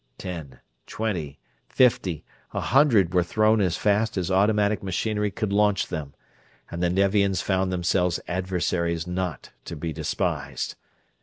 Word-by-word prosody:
Ten, 80 Hz, -8 st, -7 dB, 0.3 s
twenty, 90 Hz, -11 st, -3 dB, 0.3 s
fifty, 100 Hz, -, +2 dB, 0.3 s
a -, -, 0 dB
hundred 120 Hz, -, +3 dB
were 90 Hz, -, +4 dB
thrown 110 Hz, +4 st, +2 dB
as 90 Hz, -4 st, +1 dB
fast 105 Hz, +1 st, +1 dB
as 90 Hz, 0 st, -1 dB
automatic 105 Hz, +1 st, +2 dB
machinery 105 Hz, +3 st, -1 dB
could 100 Hz, 0 st, -3 dB
launch 105 Hz, -1 st, +2 dB
them; 75 Hz, -5 st, -5 dB, 0.6 s
and 85 Hz, -, -4 dB
the 90 Hz, -, +2 dB
Nevians 100 Hz, 0 st, +2 dB
found 95 Hz, -1 st, 0 dB
themselves 90 Hz, 0 st, +1 dB
adversaries 90 Hz, -2 st, -1 dB
not 90 Hz, -4 st, -4 dB
to -, -, -6 dB
be 80 Hz, +1 st, -4 dB
despised. 80 Hz, -1 st, -2 dB
95 Hz, 135 wpm, -25 LUFS, 85-105 Hz, 0.6 s, were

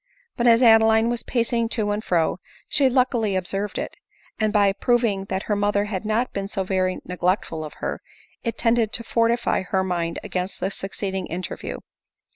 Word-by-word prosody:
But 240 Hz, -, +1 dB
as 230 Hz, +1 st, +6 dB
Adeline 225 Hz, 0 st, +6 dB
was 240 Hz, -, -2 dB
pacing 235 Hz, -1 st, 0 dB
to 210 Hz, -2 st, 0 dB
and 210 Hz, +1 st, -2 dB
fro, 170 Hz, -2 st, +1 dB, 0.3 s
she 275 Hz, -3 st, +3 dB
luckily 245 Hz, -5 st, +1 dB
observed 195 Hz, +2 st, -2 dB
it; -, -, -4 dB, 0.4 s
and 215 Hz, -1 st, +2 dB
by 200 Hz, -2 st, +4 dB
proving 225 Hz, -4 st, +1 dB
that 190 Hz, 0 st, -3 dB
her 210 Hz, -, 0 dB
mother 205 Hz, 0 st, +1 dB
had 205 Hz, -1 st, -4 dB
not 220 Hz, +4 st, 0 dB
been 195 Hz, -1 st, -3 dB
so 195 Hz, -1 st, -2 dB
very 185 Hz, -1 st, 0 dB
neglectful 180 Hz, -3 st, -1 dB
of 155 Hz, -, -7 dB
her, -, -, -3 dB, 0.4 s
it 230 Hz, -, -2 dB
tended 230 Hz, -2 st, +2 dB
to 230 Hz, -, 0 dB
fortify 230 Hz, +1 st, +1 dB
her 190 Hz, 0 st, 0 dB
mind 170 Hz, -2 st, -2 dB
against 185 Hz, +1 st, -3 dB
the 190 Hz, +2 st, -1 dB
succeeding 190 Hz, -1 st, -3 dB
interview. 175 Hz, -1 st, -5 dB
205 Hz, 175 wpm, -23 LUFS, 190-230 Hz, 0.4 s, as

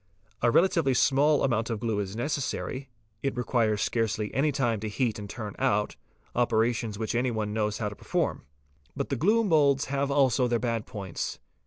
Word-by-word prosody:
A 120 Hz, -, +4 dB
relatively 165 Hz, -2 st, +3 dB
small 140 Hz, +3 st, +3 dB
amount 115 Hz, -3 st, +1 dB
of 115 Hz, -2 st, -2 dB
glue 110 Hz, -2 st, -1 dB
is 100 Hz, 0 st, -4 dB
neces 140 Hz, +6 st, -1 dB
sary, 135 Hz, 0 st, -4 dB, 0.3 s
1t 135 Hz, -2 st, -1 dB
requires 115 Hz, -4 st, +1 dB
scarcely 110 Hz, -2 st, -1 dB
any 145 Hz, +4 st, +2 dB
time 120 Hz, -5 st, 0 dB
to 110 Hz, +1 st, -4 dB
heat 110 Hz, 0 st, -1 dB
and 100 Hz, -1 st, -7 dB
turn 105 Hz, -2 st, -6 dB
out, 105 Hz, +1 st, +1 dB, 0.4 s
operations 115 Hz, -2 st, +1 dB
which 110 Hz, 0 st, -2 dB
any 125 Hz, +2 st, +1 dB
one 110 Hz, -3 st, -2 dB
knows 105 Hz, -1 st, 0 dB
how 110 Hz, -, -2 dB
to 105 Hz, -, -10 dB
perform. -, -, -2 dB, 0.5 s
But -, -, -3 dB
glue 215 Hz, +7 st, +3 dB
moulds 145 Hz, -8 st, +3 dB
have 140 Hz, 0 st, 0 dB
also 135 Hz, -3 st, +3 dB
their 120 Hz, -1 st, +1 dB
bad 115 Hz, -2 st, -2 dB
points. 95 Hz, -5 st, -5 dB
120 Hz, 180 wpm, -28 LUFS, 110-135 Hz, 0.5 s, A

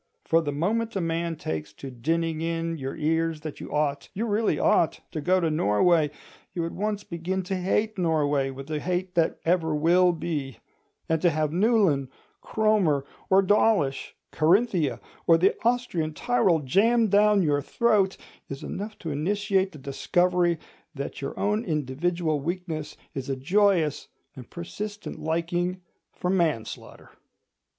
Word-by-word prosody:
For 165 Hz, 0 st, +3 dB
the 145 Hz, -3 st, -2 dB
moment 220 Hz, +10 st, -1 dB
a -, -, +1 dB
man 165 Hz, -1 st, -1 dB
takes 80 Hz, -, -5 dB
to 135 Hz, -, -8 dB
dinning 160 Hz, +5 st, -1 dB
in 165 Hz, 0 st, -2 dB
your 135 Hz, 0 st, -4 dB
ears 160 Hz, 0 st, 0 dB
that 155 Hz, -1 st, -7 dB
you -, -, -8 dB
ought, 145 Hz, -1 st, -1 dB
you 220 Hz, +4 st, -1 dB
really 215 Hz, 0 st, +1 dB
ought, 165 Hz, -, +2 dB
to 155 Hz, -, -4 dB
go 185 Hz, +4 st, +3 dB
to 165 Hz, -3 st, 0 dB
Norway, 155 Hz, -, +3 dB, 0.5 s
you 170 Hz, -2 st, -1 dB
at 165 Hz, -, -4 dB
once 205 Hz, +1 st, -2 dB
begin 180 Hz, +2 st, -3 dB
to 190 Hz, +2 st, -3 dB
hate 205 Hz, +3 st, 0 dB
Norway 145 Hz, -5 st, +1 dB
with 135 Hz, +3 st, -8 dB
a 155 Hz, -, -1 dB
hate 180 Hz, +3 st, -2 dB
that 170 Hz, -3 st, +1 dB
ever 165 Hz, -2 st, +2 dB
will 175 Hz, +4 st, +4 dB
be; 150 Hz, -6 st, -4 dB, 0.5 s
and 160 Hz, -1 st, 0 dB
to 175 Hz, -, +4 dB
have 155 Hz, -1 st, 0 dB
Newlyn, 185 Hz, -, +2 dB, 0.3 s
Cromer, 200 Hz, -11 st, +1 dB, 0.2 s
or 195 Hz, +1 st, +5 dB
Dawlish, 195 Hz, -8 st, +2 dB, 0.2 s
Carinthia 175 Hz, -, +2 dB, 0.3 s
or 165 Hz, -, +7 dB
the 185 Hz, +4 st, +3 dB
Austrian 225 Hz, -11 st, 0 dB
Tyrol 195 Hz, -9 st, +2 dB
jammed 220 Hz, -, +3 dB
down 205 Hz, -1 st, +5 dB
your 145 Hz, -2 st, +1 dB
throat, 205 Hz, -, +1 dB, 0.3 s
is 135 Hz, 0 st, -7 dB
enough 210 Hz, +2 st, -5 dB
to 165 Hz, -, -5 dB
initiate 195 Hz, +5 st, 0 dB
the 155 Hz, -, -11 dB
discovery 175 Hz, +5 st, +1 dB, 0.4 s
that 140 Hz, +1 st, -5 dB
your 140 Hz, -, -5 dB
own 210 Hz, +2 st, +1 dB
individual 155 Hz, -, -1 dB
weakness 165 Hz, -1 st, -4 dB, 0.2 s
is 135 Hz, -1 st, -5 dB
a 135 Hz, -, 0 dB
joyous 175 Hz, +2 st, +2 dB, 0.3 s
and 125 Hz, -3 st, -11 dB
persistent 205 Hz, +4 st, -6 dB
liking 175 Hz, +3 st, -1 dB, 0.3 s
for 180 Hz, -, -2 dB
manslaughter. 160 Hz, -, -2 dB
170 Hz, 150 wpm, -26 LUFS, 150-195 Hz, 0.5 s, or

